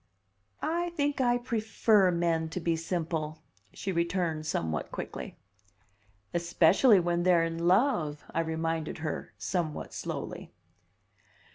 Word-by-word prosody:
"I 345 +2 0
think 285 -2 0
I 245 -1 +3
prefer 220 -4 +2
men 170 -2 +1
to 170 - -4
be 165 -1 +1
simple," 160 -2 -3 0.3
she 195 - -4
returned 170 -3 -1
somewhat 80 - -2
quickly. - - -6 1.0
"Especially 175 +6 +5
when 175 0 0
they're 175 -2 +4
in 165 +1 -2
love," 180 - +2
I - - 0
reminded 160 -1 -2
her 155 - -4
somewhat 170 -5 -3
slowly. - - -5
170 Hz, 115 wpm, -29 LUFS, 160-195 Hz, 1.0 s, Especially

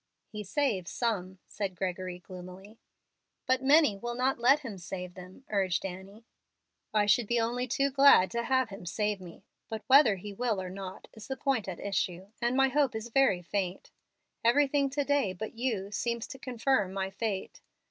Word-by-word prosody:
"He 210 -1 -5
saves 195 -4 -1
some," 195 -6 -2
said 195 -3 -4
Gregory, 185 0 -3
gloomily. 185 +4 -11 0.7
"But 260 0 +2
many 285 -4 +5
will 240 +4 -5
not 255 +1 0
let 270 +5 +5
Him 225 -9 -7
save 180 0 -6
them," 185 +8 -12
urged 195 -3 0
Annie. 195 +4 -8 0.7
"I 210 -1 +3
should 210 +2 +3
be 240 +1 +2
only 240 +2 -1
too 275 +3 +1
glad 275 -9 +6
to 235 - -1
have 260 0 +1
Him 195 -3 -9
save 210 +1 -1
me, 175 -2 -12 0.3
but 220 -1 -5
whether 265 -5 +6
He 200 +2 -8
will 225 -1 -1
or 185 -1 -5
not 190 -1 -8
is 220 -1 -11
the 265 - -4
point 260 -7 0
at 185 -3 -5
issue, 190 -1 -2
and 240 +2 +1
my 270 0 +5
hope 275 -3 +1
is 220 +2 -5
very 230 -8 +3
faint. 185 +1 -3 0.5
Everything 280 +3 +3
to 285 +2 -1
day, 280 -8 +1
but 215 +4 -6
you, 225 -5 -2
seems 235 +2 -2
to 265 - -9
confirm 245 -6 0
my 190 0 -2
fate. 200 -1 -4
215 Hz, 180 wpm, -30 LUFS, 190-255 Hz, 0.7 s, glad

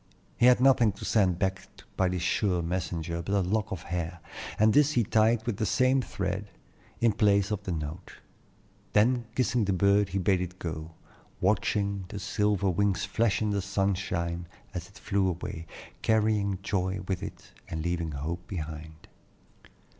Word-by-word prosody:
He 120 - +5
had 125 -1 +6
nothing 125 -5 +5
to - - -8
send 95 -6 +3
back 95 0 -1 0.3
by 95 -1 +2
this 90 -2 -2
sure 90 -1 +1
messenger 85 -1 -2
but 100 +4 -1
a 100 - +3
lock 105 +3 -1
of 95 -4 -4
hair, 85 0 -4 0.4
and 110 0 +4
this 150 +1 +5
he 120 - +3
tied 110 +2 +2
with 120 -5 -2
the 110 - 0
same 130 +1 +3
thread, 95 -2 -3 0.5
in 115 -1 +4
place 100 -1 +3
of 105 -2 -1
the 95 - -2
note. 80 +2 -5 0.8
Then 120 +3 +3
kissing 120 -2 +2
the 100 - +1
bird 100 +2 +3
he 95 - -2
bade 95 0 +2
it 90 0 -5
go, 80 -1 -5 0.5
watching 100 0 +1
the 100 - -7
silver 100 +1 0
wings 100 +2 +1
flash 110 -2 +1
in 105 - +1
the 100 -1 0
sunshine 90 -3 -1 0.3
as 90 -1 -5
it 100 - -16
flew 100 -3 0
away, 85 -1 -5 0.3
carrying 105 -3 +2
joy 95 0 -1
with 95 -2 -1
it - - -8 0.2
and 80 -1 -3
leaving 85 -2 -2
hope 85 +5 -4
behind. 80 -3 -7
95 Hz, 170 wpm, -28 LUFS, 90-105 Hz, 0.8 s, had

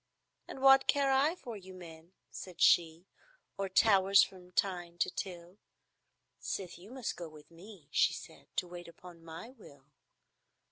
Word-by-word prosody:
"And 265 - -8
what 270 0 +7
care 280 -1 +3
I 280 +5 +3
for 240 -10 -8
you 190 -2 -11
men," 170 -1 -12 0.2
said 185 -2 -9
she, 165 +1 +4 0.5
"Or 195 -1 -3
towers 195 -1 +5
from 180 -1 -9
Tyne 175 -2 -1
to 175 - 0
Till, 180 +1 -7 0.8
Sith 180 -3 -5
you 190 +4 -14
must 255 -1 -4
go 170 -2 -7
with 155 +1 -16
me," 175 -2 -14
she - - +3
said, - - -12
"To 180 - -1
wait 175 0 -9
upon 170 0 -14
my 165 +8 -9
will?" 145 - -17
180 Hz, 155 wpm, -32 LUFS, 170-210 Hz, 0.8 s, what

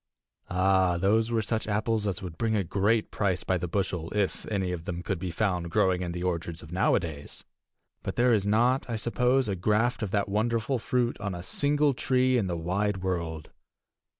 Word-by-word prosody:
Ah, 95 -1 +3
those 110 +5 +2
were 115 -2 +1
such 110 0 -2
apples 110 0 0
as 95 -1 -3
would 85 -3 -6
bring 110 +4 0
a 100 - +1
great 100 +5 +1
price 95 -3 0
by 95 - +1
the 90 0 -2
bushel 90 -2 -2
if 100 -2 -1
any 95 -4 -1
of 85 -2 -5
them 90 0 -4
could 95 -3 -2
be 90 0 -3
found 90 -1 -1
growing 90 +2 +2
in 90 -1 -3
the 90 +1 -4
orchards 85 -2 -3
of 80 - -12
nowadays! 85 -5 -1 0.6
But - - -4
there 120 0 +4
is 105 -3 +2
not, 120 +5 +2
I 115 - -1
suppose, 125 +4 +1
a 100 - -1
graft 110 +7 +1
of 105 - -2
that 100 +1 0
wonderful 115 +5 0
fruit 120 +1 0
on 100 -2 -3
a 85 - -7
single 145 +6 +2
tree 130 0 +2
in 110 -6 +1
the 85 -1 -2
wide 95 +3 -1
world. 85 -4 -3
100 Hz, 200 wpm, -28 LUFS, 90-115 Hz, 0.6 s, there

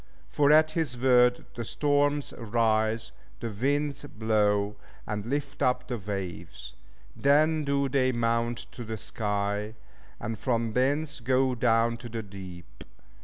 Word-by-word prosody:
For 145 0 +4
at 155 +1 +6
His 155 -6 -2
word 125 -1 +4
the 120 - -5
storms 145 +4 +1
rise, 110 - 0 0.3
the 115 - -4
winds 140 +6 -1
blow, 105 -4 +1 0.3
and 105 0 -4
lift 140 +2 -3
up 125 - +1
the 120 -3 -3
waves; 90 -10 -6 0.4
then 155 +3 +3
do 140 0 +1
they 130 -1 +2
mount 115 0 0
to 120 - -8
the 110 0 -5
sky, 105 0 -2 0.4
and 110 -1 -4
from 115 -2 0
thence 145 +4 0
go 130 +2 +2
down 115 -1 +2
to 120 0 -9
the 115 0 -4
deep. 95 -3 -11
120 Hz, 135 wpm, -28 LUFS, 110-140 Hz, 0.4 s, at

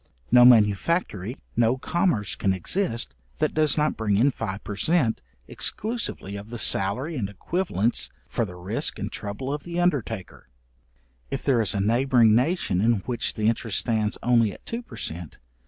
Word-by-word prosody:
No 125 0 +8
manufactory, 110 - +3 0.2
no 120 +2 +2
commerce 145 - 0
can 95 - 0
exist, 115 - -1 0.2
that - - 0
does 155 -2 +2
not 150 0 +1
bring 105 -3 +1
in 130 +6 +4
five 105 -5 -5
per 105 - -5
cent. 145 - +1 0.3
exclusively 215 - -3
of 100 +2 -8
the 120 - -6
salary 115 - +1
and 100 -6 -2
equivalents 120 - -1 0.2
for 115 - -1
the 90 -5 -6
risque 95 +5 -2
and - - -4
trouble 105 +7 -4
of 145 - -4
the 175 +2 -4
undertaker. 120 - -2 0.8
If - - -4
there 125 -4 +3
is 110 0 0
a - - 0
neighbouring 120 +2 +4
nation 125 - +1
in 115 -2 +2
which 120 +3 -2
the 110 - -2
interest 115 -2 0
stands 110 -3 0
only 115 -3 +3
at - - -14
two 230 +1 -4
per 240 - -13
cent. 85 -1 -6
115 Hz, 170 wpm, -25 LUFS, 100-140 Hz, 0.8 s, No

